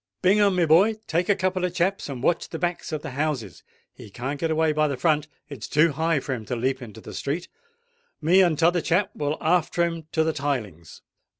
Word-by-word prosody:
"Bingham, 200 +1 +4
my 175 -2 +3
boy, 185 +8 +5
take 170 +3 -1
a 205 - +5
couple 185 -1 -1
of 180 -1 -1
chaps, 190 -1 0
and 130 -3 -6
watch 170 - +1
the 165 - -5
backs 175 0 -3
of 155 -1 -4
the 160 - -5
houses: 130 - -3 0.3
he - - -12
can't 130 +7 -5
get 165 - -1
away 160 0 +2
by 155 0 +2
the 140 -3 -3
front—it's 150 -4 -2
too 155 +2 +3
high 160 +1 +1
for 135 0 -4
him 115 -4 -5
to 125 - -3
leap 130 +3 -1
into 110 -2 -10
the - - -10
street. 160 +6 -3 0.7
Me 175 +5 +4
and 170 -5 +3
t'other 170 +2 +3
chap 190 +6 +1
will 145 +1 -2
after 170 +1 +1
him 165 -2 -5
to 160 - +2
the 160 0 0
tilings." 120 - -4
155 Hz, 215 wpm, -24 LUFS, 140-175 Hz, 0.7 s, boy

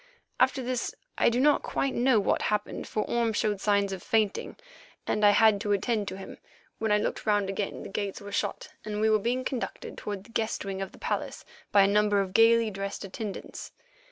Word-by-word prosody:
After 260 +1 +3
this 255 - -2 0.2
I - - +4
do 235 +1 0
not 295 +2 +4
quite 275 - -1
know 245 -2 +3
what 200 - +1
happened 210 -1 -2
for 215 - -1
Orme 235 -2 +1
showed 205 -2 0
signs 200 -2 +2
of 190 - -6
fainting, 215 -3 0 0.5
and 210 - -1
I 205 - +8
had 210 -1 +5
to 205 -2 +1
attend 210 +1 0
to 190 - -5
him. 195 - -10 0.4
When 220 -1 0
I 210 - +5
looked 210 - -3
round 205 -2 +2
again 195 +1 -4
the - - -8
gates 200 0 -3
were 205 0 -9
shut - - -2
and 210 -1 -4
we 220 0 +3
were 215 - +4
being 245 +5 -1
conducted 255 -3 -4
toward 205 -2 -5
the 230 - -18
guest 220 -2 -2
wing 195 -1 -4
of 195 - -4
the - - -15
palace - - -3 0.3
by 200 - +6
a - - +4
number 205 0 +3
of 190 -1 -2
gaily 225 0 +5
dressed 200 0 -5
attendants. 200 +1 -7
210 Hz, 210 wpm, -28 LUFS, 200-230 Hz, 0.5 s, I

